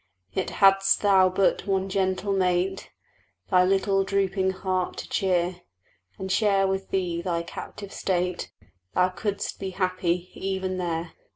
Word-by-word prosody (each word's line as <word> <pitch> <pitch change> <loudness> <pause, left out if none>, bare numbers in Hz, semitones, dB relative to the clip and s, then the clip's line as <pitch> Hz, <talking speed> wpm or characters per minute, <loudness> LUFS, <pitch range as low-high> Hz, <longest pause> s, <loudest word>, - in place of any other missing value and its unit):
Yet, - - -2
hadst 195 0 +4
thou 190 -2 +5
but 190 +2 +1
one 190 -1 +1
gentle 190 +1 0
mate 185 0 0 0.6
Thy 180 -1 +6
little 195 +1 +2
drooping 195 -1 +1
heart 185 -1 -2
to - - -6
cheer, 180 -1 0 0.6
And 190 0 -4
share 195 -1 +3
with 190 0 -2
thee 175 -3 -1
thy 170 -1 -1
captive 200 +3 -8
state, 180 -1 -1 0.4
Thou 180 0 +4
couldst 200 +2 -3
be 195 - -3
happy 185 -1 -1
even 190 -1 -3
there. 170 -1 -2
190 Hz, 135 wpm, -26 LUFS, 180-195 Hz, 0.6 s, Thy